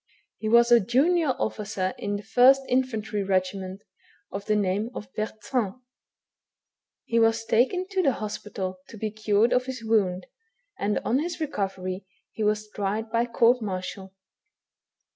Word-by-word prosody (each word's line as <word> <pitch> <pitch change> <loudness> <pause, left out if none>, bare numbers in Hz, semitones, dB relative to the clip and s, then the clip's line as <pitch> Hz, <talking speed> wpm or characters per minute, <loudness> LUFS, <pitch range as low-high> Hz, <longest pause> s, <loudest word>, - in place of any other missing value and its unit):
He 215 - -2
was 235 +1 +5
a 240 - +8
junior 275 - +2
officer 200 -4 -2
in 205 -4 -2
the 205 - -5
1st 255 +5 +5
Infantry 230 -5 0
regiment, 190 0 -1 0.5
of 200 +1 -6
the 215 - +3
name 205 +2 0
of 195 -3 -8
Bertrand. 215 0 -2 1.3
He 230 - +1
was 225 0 +3
taken 265 +13 +2
to 385 -2 +1
the 275 -7 +3
hospital 200 -3 -5
to 225 - -11
be 215 0 -3
cured 215 +1 +2
of 250 +1 +1
his 255 -3 -5
wound, 195 -5 +1 0.5
and 205 +1 0
on 255 - +2
his 345 +3 -3
recovery, 195 -9 -3 0.2
he 220 - -4
was 210 0 0
tried 210 +2 -3
by 230 +1 +1
court 235 +1 +3
martial. 190 -1 -5
215 Hz, 145 wpm, -26 LUFS, 195-240 Hz, 1.3 s, a